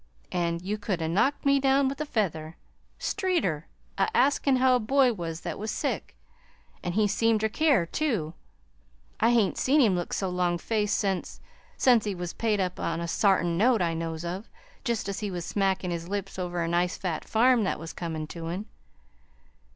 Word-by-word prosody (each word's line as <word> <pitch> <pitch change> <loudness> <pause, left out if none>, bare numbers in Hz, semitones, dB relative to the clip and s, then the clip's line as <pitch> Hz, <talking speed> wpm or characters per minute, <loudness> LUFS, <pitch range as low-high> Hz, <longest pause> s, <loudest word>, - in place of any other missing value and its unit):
An' 170 -2 -1
you 210 +3 -2
could 200 -3 -2
'a' 160 - -1
knocked 215 - +1
me 280 0 +4
down 270 0 +3
with 275 +2 -3
a 305 - -3
feather. 165 - -2 0.4
Streeter 275 - -1 0.3
a - - +3
askin' 280 - +3
how 255 0 +4
a - - +2
boy 255 +2 +3
was 165 -4 -5
that 170 -3 -5
was 215 +2 -4
sick! - - -3 0.7
An' 175 - -3
he 210 +2 +3
seemed 225 +1 +2
ter 220 - +1
care, 280 - +3
too. 200 - -1 0.9
I 225 - +4
hain't 230 -5 +2
seen 285 +4 +3
him 225 -8 +5
look 175 -1 -3
so 195 - -1
longfaced 180 +4 0
since 195 -2 -2 0.4
since 245 -4 +5
he 205 -2 -2
was 175 -1 -5
paid 220 -3 0
up 185 -1 -2
on 165 0 -2
a 170 - -3
sartin 175 -2 +2
note 230 -2 +4
I 165 -1 0
knows 165 0 -4
of, 185 +6 -5 0.3
jest 235 -6 -1
as 200 0 -3
he 210 - -3
was 175 -3 -4
smackin' 190 -2 0
his 170 0 -4
lips 195 0 -4
over 175 -1 -2
a - - -1
nice 175 +1 0
fat 180 -4 -3
farm 240 +1 +3
that - - -1
was 165 +1 -8
comin' 160 -3 -4
to 165 +1 -7
him! 180 +5 -4
195 Hz, 190 wpm, -27 LUFS, 170-230 Hz, 0.9 s, him